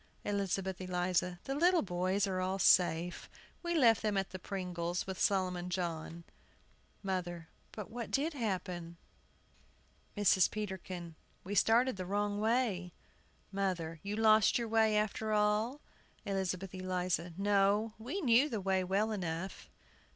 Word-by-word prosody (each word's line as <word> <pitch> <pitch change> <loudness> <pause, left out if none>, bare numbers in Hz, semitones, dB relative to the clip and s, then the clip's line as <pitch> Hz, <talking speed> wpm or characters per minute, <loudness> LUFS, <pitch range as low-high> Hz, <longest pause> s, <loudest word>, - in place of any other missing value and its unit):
ELIZABETH 195 -2 -1
ELIZA. 180 -1 -1
The 270 - -3
little 345 +4 +3
boys 185 +2 0
are 185 -2 -2
all 185 +1 -1
safe. 175 -2 +3 0.3
We 345 0 -1
left 235 -8 +5
them 210 -2 0
at 195 0 -1
the 185 - -6
Pringles', 180 -2 -3
with 190 -1 -5
Solomon 180 -2 +1
John. 170 -2 -3 0.8
MOTHER. 175 -3 -3 0.2
But 210 -1 -8
what 235 0 -5
did 305 +4 0
happen? 180 - -3 1.2
MRS. 190 -3 +4
PETERKIN. 185 -4 -5 0.3
We 195 - -5
started 230 +4 +3
the 185 -1 -5
wrong 205 +1 -1
way. 215 -6 0 0.6
MOTHER. 180 -5 -2
You 200 +1 -4
lost 215 -1 +5
your 235 -1 -2
way, 220 -1 +3
after 215 +1 -1
all? 210 +6 +1 0.4
ELIZABETH 190 -1 -2
ELIZA. 180 -2 -2
No; 205 +2 +2
we 265 - -4
knew 260 +1 +4
the 225 -5 -2
way 190 -1 +1
well 200 +4 +1
enough. 185 -2 -4
195 Hz, 135 wpm, -33 LUFS, 180-215 Hz, 1.2 s, left